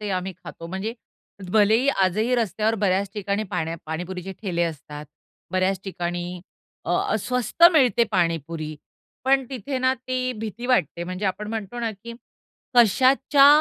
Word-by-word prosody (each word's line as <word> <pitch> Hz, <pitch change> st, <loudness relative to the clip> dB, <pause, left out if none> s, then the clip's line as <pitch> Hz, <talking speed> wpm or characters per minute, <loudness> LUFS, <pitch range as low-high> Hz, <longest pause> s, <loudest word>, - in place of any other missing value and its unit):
ते 210 Hz, -, -4 dB
आम्ही 185 Hz, 0 st, -2 dB
खातो. 165 Hz, -, -8 dB
म्हणजे 190 Hz, +6 st, -4 dB, 0.6 s
भले 215 Hz, 0 st, +5 dB
ही 275 Hz, -, 0 dB, 0.2 s
आजही 215 Hz, +7 st, +1 dB
रस्त्यावर 220 Hz, -1 st, +1 dB
बऱ्याच 195 Hz, -1 st, +1 dB
ठिकाणी 200 Hz, +1 st, -1 dB
पाण्या 165 Hz, -1 st, -2 dB
पाणीपुरीचे 180 Hz, +4 st, -5 dB
ठेले 175 Hz, -4 st, -1 dB
असतात, 150 Hz, -2 st, -5 dB, 0.5 s
बऱ्याच 185 Hz, 0 st, +1 dB
ठिकाणी 175 Hz, -1 st, -4 dB, 0.4 s
अ, -, -, -3 dB
अ, 215 Hz, -, +1 dB
स्वस्त 250 Hz, -, -2 dB
मिळते 245 Hz, -6 st, +4 dB
पाणीपुरी, 165 Hz, -4 st, -1 dB, 0.5 s
पण 270 Hz, 0 st, +3 dB
तिथे 260 Hz, +1 st, -3 dB
ना, 260 Hz, 0 st, +3 dB
ती 255 Hz, 0 st, -2 dB
भीती 225 Hz, +2 st, -6 dB
वाटते. 175 Hz, -, +1 dB
म्हणजे 185 Hz, +3 st, -5 dB
आपण 210 Hz, +3 st, -3 dB
म्हणतो 225 Hz, +1 st, -5 dB
ना, 230 Hz, -1 st, -1 dB
की 230 Hz, +4 st, -10 dB, 0.6 s
कशाच्या 265 Hz, +5 st, +5 dB
200 Hz, 145 wpm, -24 LUFS, 180-240 Hz, 0.6 s, भले